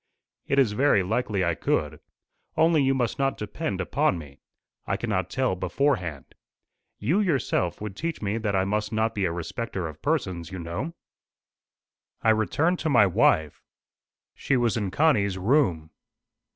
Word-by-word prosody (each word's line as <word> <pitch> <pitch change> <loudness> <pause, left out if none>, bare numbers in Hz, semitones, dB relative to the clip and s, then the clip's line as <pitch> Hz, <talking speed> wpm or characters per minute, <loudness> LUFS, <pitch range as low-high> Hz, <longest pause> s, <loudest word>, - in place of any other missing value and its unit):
"It 140 - 0
is 130 -6 +4
very 105 -3 +3
likely 100 -1 0
I 85 - +1
could. - - -1 0.6
Only 160 -1 +4
you 135 0 +2
must 125 -1 -1
not 135 -1 +1
depend 105 - -4
upon 90 -1 +1
me. 70 -4 -11 0.5
I - - 0
cannot 95 -6 -2
tell 130 -2 0
beforehand. 90 - -1 0.6
You 150 - +1
yourself 130 - 0
would 105 -2 -5
teach 165 +6 -3
me 105 +2 -2
that 105 -3 -1
I 95 0 +2
must 105 +2 -1
not 110 +1 0
be 100 -3 -1
a 85 - 0
respecter 90 +2 -4
of 80 -1 -10
persons, 95 - -1
you 95 - -5
know." 85 - -5 1.3
I 110 - +5
returned 145 - +1
to 160 - -1
my 120 -7 +6
wife. 85 -6 +2 0.7
She 135 - 0
was 120 -3 +1
in 105 -4 -1
Connie's 100 - +2
room. 95 - +1
105 Hz, 155 wpm, -26 LUFS, 90-135 Hz, 1.3 s, my